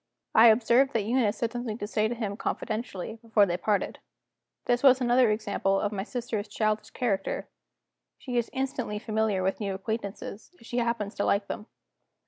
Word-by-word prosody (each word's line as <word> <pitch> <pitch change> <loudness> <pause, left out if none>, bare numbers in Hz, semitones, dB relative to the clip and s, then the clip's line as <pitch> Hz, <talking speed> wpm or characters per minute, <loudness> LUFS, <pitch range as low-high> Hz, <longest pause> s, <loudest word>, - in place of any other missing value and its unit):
I 225 +2 +8
observed 240 +4 +4
that 225 - +1
Eunice 225 -1 +1
had 230 -1 0
something 240 -3 -4
to 205 - -4
say 215 +1 +1
to 240 - -3
him 210 -4 -3
confidentially, 220 -1 -4
before 220 -3 +4
they 175 -3 -1
parted. 200 +2 -1 0.7
This 245 0 +2
was 265 -2 +6
another 245 -1 +4
example 205 -2 0
of 205 - -1
my 200 -2 -3
sister's 225 -1 -4
childish 215 +1 -1
character; 200 -6 -2 0.7
she 250 -3 -6
is 235 -1 +1
instantly 260 -5 -2
familiar 215 -3 0
with 190 +1 0
new 200 -3 -2
acquaintances, 210 - -5
if 230 - -16
she 240 +2 -2
happens 235 -3 -1
to - - -2
like 200 0 +2
them. 210 +2 -6
220 Hz, 175 wpm, -28 LUFS, 205-240 Hz, 0.7 s, I